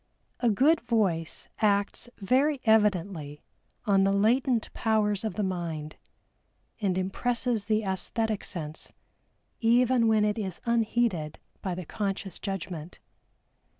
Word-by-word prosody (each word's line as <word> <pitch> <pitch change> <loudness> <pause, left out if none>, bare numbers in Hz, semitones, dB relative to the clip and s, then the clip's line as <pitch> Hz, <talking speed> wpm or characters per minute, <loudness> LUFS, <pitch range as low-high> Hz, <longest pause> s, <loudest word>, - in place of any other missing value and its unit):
A 240 - +3
good 280 +10 +4
voice 200 -9 -1
acts 205 +2 +1
very 265 +8 +2
evidently 195 -9 +1 0.4
on 195 -3 +4
the 195 - +3
latent 230 +4 +2
powers 215 -2 +1
of 220 - -3
the 210 - -1
mind, 165 -5 -3 0.8
and 190 -4 0
impresses 230 +4 0
the 215 -1 +1
æsthetic 210 +3 -1
sense, 155 -4 -4 0.7
even 240 +1 +4
when 215 -1 +4
it 210 +1 0
is 190 -4 -4
unheeded 225 -8 0 0.2
by 185 -2 -2
the 180 -1 -6
conscious 195 0 -3
judgment. 180 -4 -5
210 Hz, 115 wpm, -28 LUFS, 185-230 Hz, 0.8 s, good